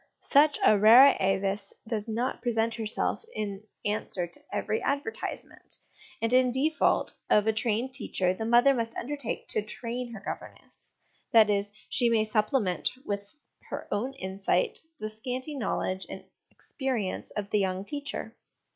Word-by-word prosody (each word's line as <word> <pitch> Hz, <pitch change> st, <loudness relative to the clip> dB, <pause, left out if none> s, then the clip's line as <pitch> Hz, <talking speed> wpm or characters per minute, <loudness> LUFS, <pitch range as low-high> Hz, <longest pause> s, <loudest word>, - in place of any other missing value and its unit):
Such 290 Hz, +1 st, +5 dB
a 210 Hz, -, +6 dB
rara 240 Hz, +7 st, +9 dB
avis 195 Hz, +1 st, 0 dB
does 220 Hz, -1 st, -2 dB
not 235 Hz, +4 st, -2 dB
present 230 Hz, -1 st, +1 dB
herself 220 Hz, -, -1 dB
in 200 Hz, -1 st, -4 dB, 0.2 s
answer 205 Hz, -3 st, -1 dB
to 170 Hz, -, -5 dB
every 215 Hz, -, -1 dB
advertisement; 280 Hz, +10 st, -4 dB, 0.5 s
and 230 Hz, +2 st, +1 dB
in 255 Hz, 0 st, +5 dB
default 280 Hz, +6 st, +1 dB, 0.2 s
of 210 Hz, -, +4 dB
a 220 Hz, -, +3 dB
trained 230 Hz, +3 st, -1 dB
teacher, 190 Hz, -7 st, 0 dB
the 205 Hz, -, -5 dB
mother 240 Hz, +4 st, +5 dB
must 230 Hz, -2 st, -2 dB
undertake 280 Hz, -1 st, -4 dB
to 215 Hz, -, +3 dB
train 235 Hz, +3 st, -5 dB
her 215 Hz, -, -7 dB
governess 200 Hz, -, -9 dB, 0.4 s
that 220 Hz, -2 st, +7 dB
is, 200 Hz, 0 st, 0 dB, 0.2 s
she 240 Hz, -2 st, +3 dB
may 225 Hz, -2 st, +3 dB
supplement 215 Hz, -2 st, +1 dB, 0.2 s
with 200 Hz, +2 st, -4 dB, 0.3 s
her -, -, -5 dB
own 240 Hz, +7 st, -1 dB
insight 195 Hz, -, 0 dB, 0.2 s
the 215 Hz, -, -3 dB
scanty 250 Hz, +6 st, -3 dB
knowledge 190 Hz, -7 st, -2 dB
and -, -, -7 dB, 0.3 s
experience 255 Hz, -9 st, -3 dB
of 200 Hz, -1 st, -4 dB
the 210 Hz, -, +3 dB
young 190 Hz, 0 st, -1 dB
teacher. 285 Hz, +4 st, -5 dB
220 Hz, 145 wpm, -28 LUFS, 205-255 Hz, 0.5 s, rara